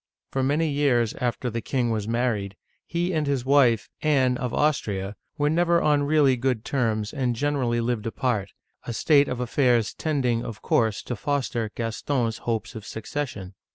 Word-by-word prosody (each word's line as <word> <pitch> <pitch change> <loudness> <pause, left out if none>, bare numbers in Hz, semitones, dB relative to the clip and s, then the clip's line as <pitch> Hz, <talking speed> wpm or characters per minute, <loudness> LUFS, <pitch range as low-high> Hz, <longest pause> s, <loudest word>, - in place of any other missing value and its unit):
For 135 - 0
many 145 +5 +1
years 135 -6 +2
after 125 0 -1
the 115 +1 -3
king 120 0 0
was 110 -2 -2
married, 115 -4 -1 0.3
he 175 +2 -1
and 155 -2 0
his 135 -3 0
wife, 130 -5 +4
Anne 135 -5 +3
of 125 -1 -3
Austria, 105 -10 0 0.2
were 145 - +2
never 170 +2 +3
on 150 -2 +3
really 145 -2 +4
good 125 -2 -1
terms, 110 -5 -1
and 130 -5 0
generally 130 -3 0
lived 115 -2 -1
apart, 115 -4 -1 0.2
— - - -48
a 120 - -2
state 145 +3 +4
of 125 - -3
affairs 125 -3 +2
tending, 130 -7 0
of 110 -2 -7
course, 110 -3 +1
to 120 - -4
foster 125 -4 -1
Gaston's 115 0 -1
hopes 115 -1 -3
of 110 -3 -8
succession. 110 -4 -5
125 Hz, 170 wpm, -25 LUFS, 115-145 Hz, 0.3 s, wife